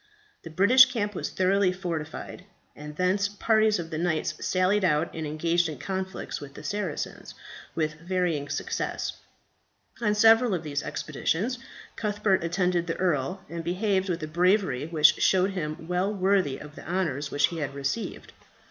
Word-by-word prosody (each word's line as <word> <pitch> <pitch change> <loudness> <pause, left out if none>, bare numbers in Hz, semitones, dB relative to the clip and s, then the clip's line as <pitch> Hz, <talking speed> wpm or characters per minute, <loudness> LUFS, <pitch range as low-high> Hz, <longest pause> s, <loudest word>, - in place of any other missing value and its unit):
The 165 - -9
British 215 +11 +7
camp 215 -5 -2
was - - -3
thoroughly 190 0 +2
fortified, 175 -1 -5 0.3
and 150 0 -9
thence 185 +4 +1
parties 215 +1 +2
of 170 -1 -6
the 155 - -3
knights 170 -2 0
sallied 190 +2 +2
out 155 -2 +1
and 160 -1 -4
engaged 165 +3 +1
in 150 - -6
conflicts 190 +4 -4
with 140 -1 -10
the - - -10
Saracens, 200 -7 -4 0.4
with 155 -1 -1
varying 170 -4 -1
success. - - -3 0.9
On 210 -2 +2
several 225 0 +5
of 170 - -4
these 145 -2 -2
expeditions 200 - -2 0.4
Cuthbert 205 -3 +1
attended 175 0 0
the 165 - -2
earl, 180 +2 -1
and 170 0 -6
behaved 190 +2 0
with 170 -2 -2
a - - -3
bravery 175 -4 +1
which 160 -1 +4
showed 190 +1 +3
him 160 -3 -5
well 180 +3 0
worthy 190 -8 +1
of 150 0 -11
the - - -10
honours 150 -6 -1
which 145 0 +2
he 170 - -5
had 140 -2 -3
received. 140 +11 -4
180 Hz, 160 wpm, -27 LUFS, 155-195 Hz, 0.9 s, British